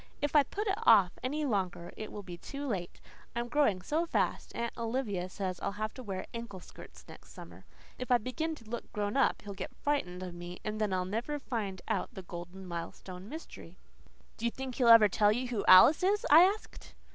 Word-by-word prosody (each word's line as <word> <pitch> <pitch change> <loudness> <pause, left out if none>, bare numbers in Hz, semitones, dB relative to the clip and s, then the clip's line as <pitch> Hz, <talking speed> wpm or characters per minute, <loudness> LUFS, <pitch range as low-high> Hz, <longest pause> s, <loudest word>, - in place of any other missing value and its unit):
"If 290 +1 -2
I 295 - +9
put 400 +10 -4
it 400 0 0
off 190 - +6
any 295 +4 -2
longer 185 -7 -2
it 215 - -7
will 205 - -7
be 180 -2 -8
too 280 +11 -7
late. 190 -9 -4 0.4
I'm 240 0 -2
growing 235 -9 +2
so 320 - 0
fast, - - -1
Aunt 235 0 -3
Olivia 225 -6 -2
says 185 -2 -4
I'll - - -3
have 215 +1 -4
to 260 - -9
wear 195 -5 -5
ankle 230 -5 -6
skirts - - -14
next - - -14
summer. - - -12 0.3
If 255 - -5
I 245 - +6
begin 315 +8 -3
to 230 -6 -16
look 235 +1 -6
grown 205 0 -2
up 275 - +2
he'll 205 -1 -7
get 195 -1 -7
frightened 185 -12 -1
of 180 -1 -6
me, 175 +1 -8
and 215 0 -3
then 210 -2 +1
I'll 185 -1 0
never 230 +10 -3
find 210 -9 -4
out 215 -5 -2
the 190 - -7
Golden 175 +2 -9
Milestone 180 +2 -7
mystery." 320 +4 -10 0.6
"Do 230 - -4
you - - +3
think 260 +1 -6
he'll 245 -1 +1
ever 230 -2 +9
tell 205 +1 +3
you 245 +3 -1
who 225 -5 -2
Alice 185 - +8
is?" 410 +5 +2
I 340 - +10
asked. 410 +3 -4
215 Hz, 215 wpm, -31 LUFS, 185-265 Hz, 0.6 s, I